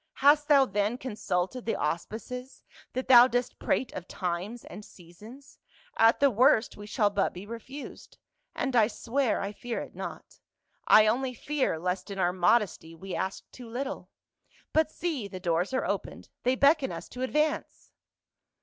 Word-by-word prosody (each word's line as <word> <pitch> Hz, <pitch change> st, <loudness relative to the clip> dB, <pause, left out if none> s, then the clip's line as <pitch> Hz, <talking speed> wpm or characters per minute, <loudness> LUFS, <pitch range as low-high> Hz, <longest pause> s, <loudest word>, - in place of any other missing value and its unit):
Hast 290 Hz, +1 st, +4 dB
thou 280 Hz, -3 st, +6 dB
then 205 Hz, +1 st, -1 dB
consulted 220 Hz, -1 st, -3 dB
the -, -, +1 dB
auspices, 240 Hz, -, -4 dB, 0.3 s
that 255 Hz, -, -3 dB
thou 245 Hz, -1 st, +9 dB
dost 245 Hz, 0 st, -2 dB
prate 255 Hz, -, -1 dB
of 180 Hz, -, -7 dB
times 185 Hz, +7 st, -4 dB
and 210 Hz, -, -10 dB
seasons? 210 Hz, -, -15 dB, 0.4 s
At 225 Hz, +1 st, +5 dB
the 280 Hz, -1 st, +4 dB
worst, 240 Hz, 0 st, +3 dB
we 205 Hz, 0 st, -10 dB
shall 210 Hz, -2 st, +1 dB
but 200 Hz, -1 st, 0 dB
be 185 Hz, +3 st, -8 dB
refused 235 Hz, +6 st, -9 dB, 0.2 s
— -, -, -47 dB
and 265 Hz, -2 st, -2 dB
I 220 Hz, -3 st, +5 dB
swear 245 Hz, +2 st, -1 dB
I 200 Hz, -, -3 dB
fear 235 Hz, +3 st, -5 dB
it -, -, -8 dB
not. -, -, -8 dB, 0.5 s
I 215 Hz, -, +8 dB
only 250 Hz, +4 st, 0 dB
fear 280 Hz, -, -1 dB
lest 180 Hz, +4 st, -3 dB
in 200 Hz, -, -6 dB
our 180 Hz, -1 st, +1 dB
modesty 180 Hz, -3 st, +1 dB
we 190 Hz, +3 st, -8 dB
ask 190 Hz, -, -3 dB
too 245 Hz, -3 st, -11 dB
little. 270 Hz, +4 st, -5 dB, 0.6 s
But 315 Hz, -1 st, +3 dB
see, 310 Hz, -10 st, -3 dB
the 185 Hz, -2 st, -8 dB
doors 175 Hz, +2 st, 0 dB
are 260 Hz, -, -1 dB
opened! -, -, -4 dB
They 255 Hz, +1 st, +2 dB
beckon 280 Hz, 0 st, +3 dB
us -, -, -7 dB
to 250 Hz, -, -8 dB
advance 300 Hz, +4 st, -1 dB
235 Hz, 165 wpm, -28 LUFS, 195-265 Hz, 0.6 s, thou